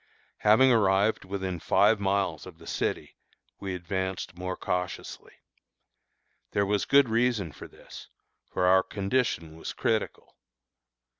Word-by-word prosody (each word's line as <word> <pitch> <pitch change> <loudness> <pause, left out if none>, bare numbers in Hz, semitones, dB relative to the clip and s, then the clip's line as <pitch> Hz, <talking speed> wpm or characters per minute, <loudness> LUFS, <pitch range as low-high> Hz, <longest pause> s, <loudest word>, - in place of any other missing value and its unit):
Having 115 +5 +5
arrived 100 -2 +2
within 95 -2 -4
five 110 +6 +3
miles 95 -5 -1
of 90 -3 -12
the - - -15
city, - - -3 0.4
we 95 -2 -4
advanced 95 0 -4
more 90 +1 -4
cautiously. 90 0 -4 1.2
There 100 - +2
was 100 0 0
good 140 -1 +5
reason 115 -6 +1
for - - -11
this, - - -13 0.4
for 90 - 0
our 95 +1 +6
condition 100 -6 -2
was - - -6
critical. 115 -4 -2
95 Hz, 125 wpm, -28 LUFS, 90-110 Hz, 1.2 s, our